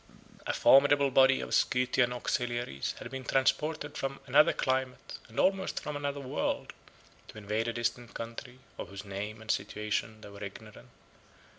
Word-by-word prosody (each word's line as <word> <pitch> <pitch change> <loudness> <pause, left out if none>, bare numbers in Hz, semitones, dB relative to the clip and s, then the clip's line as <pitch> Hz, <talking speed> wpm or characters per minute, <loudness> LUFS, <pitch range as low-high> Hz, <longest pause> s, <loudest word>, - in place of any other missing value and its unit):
A - - 0
formidable 140 0 +5
body 135 +1 +5
of - - -5
Scythian 125 -1 +2
auxiliaries 120 - -2
had 120 - -8
been 130 -1 -5
transported 150 +4 0
from 135 0 -3
another 150 +5 +5
climate, 130 -1 -2
and 110 - -6
almost 190 0 +1
from 150 - -5
another 145 0 -3
world, 130 -2 -2 0.5
to - - -12
invade 105 +2 -2
a 115 - -1
distant 120 0 -3
country, 115 +2 -7 0.2
of - - -6
whose 100 +1 -8
name 105 +3 -5
and 110 - -1
situation 105 +1 -2
they 105 - -10
were 100 0 -10
ignorant. 105 +2 -10
125 Hz, 155 wpm, -30 LUFS, 110-135 Hz, 0.5 s, formidable